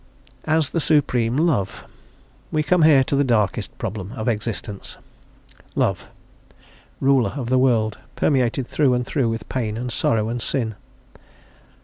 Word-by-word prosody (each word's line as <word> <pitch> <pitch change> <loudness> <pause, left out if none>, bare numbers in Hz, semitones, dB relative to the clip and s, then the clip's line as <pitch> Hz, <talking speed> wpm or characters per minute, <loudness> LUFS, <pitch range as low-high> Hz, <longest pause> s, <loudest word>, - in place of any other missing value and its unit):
As 155 -3 +1
the 170 - 0
Supreme 130 -6 +1
Love. 145 - 0 0.7
We 155 - +1
come 170 +4 +2
here 150 -4 +6
to 140 - -1
the 140 - +3
darkest 115 -6 0
problem 100 +1 -5
of 110 -3 -5
existence. 105 -3 -4 0.8
Love, - - 0 0.9
Ruler 135 -3 +2
of 125 -4 -4
the 130 0 +3
world 115 -5 +2 0.2
permeated 130 -2 +1
through 130 -1 +2
and 125 0 -1
through 125 -2 0
with 115 -2 -4
pain, 110 -4 -2
and 125 +1 -4
sorrow, 110 -1 +1
and 120 +1 -3
sin? 115 -3 0
125 Hz, 140 wpm, -22 LUFS, 110-140 Hz, 0.9 s, here